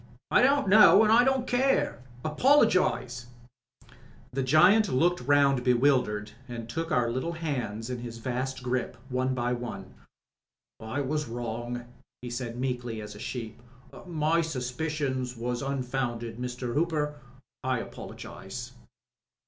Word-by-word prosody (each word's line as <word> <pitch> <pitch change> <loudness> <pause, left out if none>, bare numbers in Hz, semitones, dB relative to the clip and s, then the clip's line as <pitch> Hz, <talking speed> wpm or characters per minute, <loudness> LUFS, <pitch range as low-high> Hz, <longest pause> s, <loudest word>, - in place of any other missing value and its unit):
"I - - +5
don't 275 -2 +3
know 210 +1 +8
an' 215 - +3
I 235 +2 +7
don't 265 -1 +1
care. 250 - +1 0.2
Apologise 155 - +3 0.6
I" - - -21 0.4
The 135 - 0
giant 180 +11 +5
looked 170 +6 +2
round 140 -1 +3
bewildered 125 -4 +2 0.2
and 115 -2 -6
took 165 +8 -4
our 120 -2 +2
little 130 +8 -2
hands 125 -8 -3
into 125 -1 -4
his 115 -1 -7
vast 130 +2 -3
grip, 125 0 -2
one 130 0 0
by 120 0 0
one. 120 0 -6 0.9
"I 110 +6 -3
was 150 +1 -2
wrong," 120 +1 -4 0.4
he 120 - -5
said 120 -1 -4
meekly 125 -3 -3
as 105 0 -7
a 105 - -11
sheep. 115 -1 -6 0.5
"My 165 0 +1
suspicions 130 -3 -3
was 120 +1 -2
unfounded. 125 -4 -3
Mr. 125 -1 -4
Hooper, 150 -1 0 0.4
I 130 -1 +1
apologise." - - -8
130 Hz, 135 wpm, -28 LUFS, 120-155 Hz, 0.9 s, know